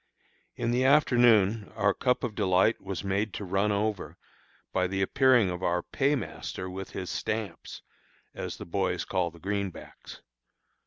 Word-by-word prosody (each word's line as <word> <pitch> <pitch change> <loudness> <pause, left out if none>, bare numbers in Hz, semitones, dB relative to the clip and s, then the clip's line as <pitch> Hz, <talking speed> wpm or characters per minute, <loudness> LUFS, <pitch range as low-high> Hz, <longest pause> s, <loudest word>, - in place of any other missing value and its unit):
In 115 - -1
the 125 +2 +2
afternoon 120 -7 +4
our 100 0 +2
cup 125 +4 0
of 120 -3 -2
delight 95 +1 +2
was 95 -1 -5
made 100 +2 -1
to 105 - -5
run 100 +3 +1
over 105 -1 -2 0.6
by 90 - +1
the 95 +1 -1
appearing 125 -3 +4
of 90 0 -5
our 90 -1 0
paymaster 135 -8 -2
with 95 +1 -6
his 90 - -5
"stamps," 110 -4 -4 0.5
as - - -5
the - - -8
boys 90 0 -1
call 90 -2 0
the 85 - -16
greenbacks. 100 0 -5
100 Hz, 150 wpm, -28 LUFS, 95-115 Hz, 0.6 s, afternoon